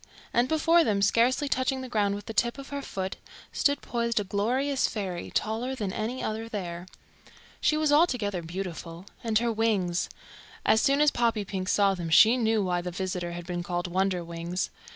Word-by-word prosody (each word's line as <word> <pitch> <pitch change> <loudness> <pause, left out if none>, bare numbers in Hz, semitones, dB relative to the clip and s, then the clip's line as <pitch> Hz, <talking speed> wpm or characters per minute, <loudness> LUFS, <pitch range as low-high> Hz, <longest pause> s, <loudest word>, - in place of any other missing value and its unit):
And 240 +1 +3
before 330 +2 +4
them, 200 -5 +1
scarcely 245 +7 +3
touching 260 -1 0
the 260 - -6
ground 205 -4 +1
with 205 - -8
the 225 - -6
tip 235 +3 +1
of 275 0 -9
her 280 0 -4
foot, 190 -7 -4 0.4
stood 285 0 +1
poised 235 -1 0
a - - -1
glorious 250 +8 0
fairy, 185 -5 -4
taller 235 +5 -1
than 205 -6 -3
any 230 +4 -3
other 220 +1 -3
there. 175 -4 -5 0.7
She 305 - +3
was 310 -1 +2
altogether 250 - +2
beautiful; 170 0 -6 0.2
and 225 -2 +2
her 235 +1 +1
wings 205 -6 0 0.6
as 220 - +4
soon 280 +1 +3
as 300 -1 +5
Poppypink 205 -5 -1
saw 200 -1 +4
them 175 -3 -4
she 220 +9 +7
knew 225 -3 +1
why 180 -1 0
the 180 - -4
visitor 180 -1 -3
had 175 0 -7
been 175 -1 -3
called 175 0 -3
Wonderwings. 175 -1 -2
210 Hz, 180 wpm, -27 LUFS, 180-245 Hz, 0.7 s, she